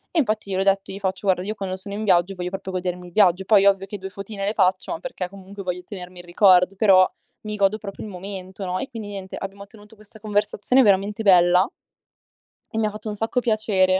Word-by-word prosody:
E - - +4
infatti 215 -6 -1
gliel'ho 190 0 0
detto, 195 0 +1
gli 195 - -7
faccio: 195 +1 -3
"Guarda, 185 -1 +2
io 210 +3 -3
quando 195 -3 -4
sono 195 +2 -8
in 210 +2 -4
viaggio, 180 -2 +3
voglio 180 -1 -4
proprio 190 0 -6
godermi 180 -1 -4
il 175 - -15
viaggio". 190 -2 +4
Poi 200 -1 +5
ovvio 195 -1 +3
che 205 +1 -7
2 190 +1 -6
fotine 200 0 -6
le 205 - 0
faccio, 185 -2 +1
ma - - -3
perché 180 +1 -5
comunque 195 +1 -10
voglio 180 -1 -4
tenermi 180 -2 -9
il 175 - -11
ricordo, 180 +1 +4
però 190 -2 +5 0.3
mi 210 0 -5
godo 200 +1 +2
proprio 200 -2 -8
il 215 - -7
momento, 190 0 -7
no, 185 0 -2
e 275 - -5
quindi, 225 -5 -7
niente, 195 -2 -7
abbiamo 200 +1 -7
tenuto 210 +1 -16
questa 215 +1 -16
conversazione 210 +4 +1
veramente 205 0 +2
bella. 180 0 +5 1.1
E - - +1
mi 220 - +2
ha - - -1
fatto 215 +1 -9
un 210 - -3
sacco 225 +4 -1
piacere, 210 -5 +2
195 Hz, 230 wpm, -23 LUFS, 185-210 Hz, 1.1 s, Poi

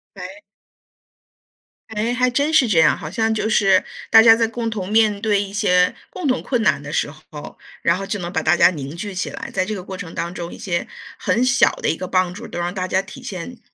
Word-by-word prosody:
哎。 300 +1 -9 1.5
哎， 220 +2 -2
还 250 0 +2
真 285 +5 +1
是 310 -6 +4
这 190 -7 +3
样。 - - +4
好 155 - -7
像 225 +1 0
就 220 0 -1
是 195 -3 +3 0.3
大 225 - +8
家 225 0 +8
在 230 0 +1
共 230 0 -3
同 200 -4 -5
面 215 -2 +3
对 205 -2 +2
一 200 -1 -7
些 180 -4 +3 0.2
共 360 -5 -4
同 255 -1 +1
困 245 -4 -1
难 140 -8 +2
的 145 +1 -8
时 145 - -1
候， 155 -1 -12 0.3
然 170 - +3
后 195 - -5
就 205 - -3
能 175 0 -6
把 160 - 0
大 160 +2 +2
家 - - +6
凝 145 -2 -7
聚 200 +3 -6
起 190 - -3
来， - - -8
在 - - +1
这 215 +2 -4
个 185 - -7
过 190 +1 -7
程 180 -3 -8
当 170 +1 -3
中， 170 -2 -6
一 - - -10
些 170 -3 -3 0.3
很 240 +2 +1
小 245 -1 +4
的 - - -4
一 - - +1
个 185 - -6
帮 185 -1 +1
助 220 +6 -9
都 - - -6
让 175 +1 -2
大 185 -1 -3
家 190 +1 +1
体 200 +7 -12
现， 240 +1 -7
200 Hz, 260 characters per minute, -20 LUFS, 175-225 Hz, 1.5 s, 大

